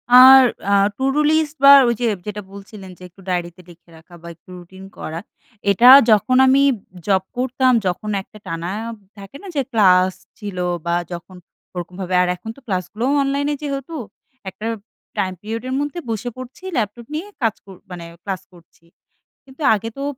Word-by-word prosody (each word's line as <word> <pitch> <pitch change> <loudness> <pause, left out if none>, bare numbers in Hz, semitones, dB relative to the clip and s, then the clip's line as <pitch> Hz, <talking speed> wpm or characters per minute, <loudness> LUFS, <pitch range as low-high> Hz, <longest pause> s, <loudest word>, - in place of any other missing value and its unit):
R 260 +1 +10 0.3
a - - +4 0.2
to 265 - -4
do - - +2
list 310 -1 +1
বা, 280 - +10 0.2
ওইযে 235 +1 -1 0.2
যেটা 210 0 -5
বলছিলেন 200 -1 -11
যে - - -13
একটু 185 +3 -20
ডায়েরিতে 175 0 -3
লিখে 170 0 -18
রাখা 165 +2 -19
বা, 170 - -11
একটু 165 - -27
রুটিন 185 +2 -13
করা। 160 +1 -6 0.5
এটা 235 +6 +6 0.2
যখন 255 +4 +3
আমি 270 +1 +4
উব - - -14 0.3
জব 190 -2 +2
করতাম 255 +1 +1 0.2
যখন, 185 +4 -3
একটা 215 - -17
টানা 165 +1 -4 0.5
থাকে 200 +6 -11
না - - -9
যে 280 - +2
ক্লাস 185 -4 +4 0.2
ছিল 205 -3 -7 0.3
বা, 170 0 0 0.2
যখন 175 +2 -9 0.4
ওরকমভাবে 180 +1 -6
আর 180 - +1
এখন 220 - -10
তো - - -16
ক্লাসগুলোও 210 +6 -2
অনলাইনে 280 +2 -1
যেহেতু 280 +2 -5 0.5
একটা 190 +3 -10 0.5
টাইম 190 -2 -1
পিরিয়ডের 230 +4 -5
মধ্যে 290 +4 -3
বসে 225 +2 -3
পড়ছি 255 +7 -11
ল্যাপটপ 230 +1 -3
নিয়ে 335 +6 -4
কাজ 225 -2 +1
কর 195 -1 -12 0.2
মানে 175 -1 -8 0.2
ক্লাস 190 -2 -4
করছি। 170 -1 -22 0.6
কিন্তু 270 +3 -16
আগে 225 +2 -5
তো 275 - -4
210 Hz, 170 wpm, -20 LUFS, 185-255 Hz, 0.6 s, আর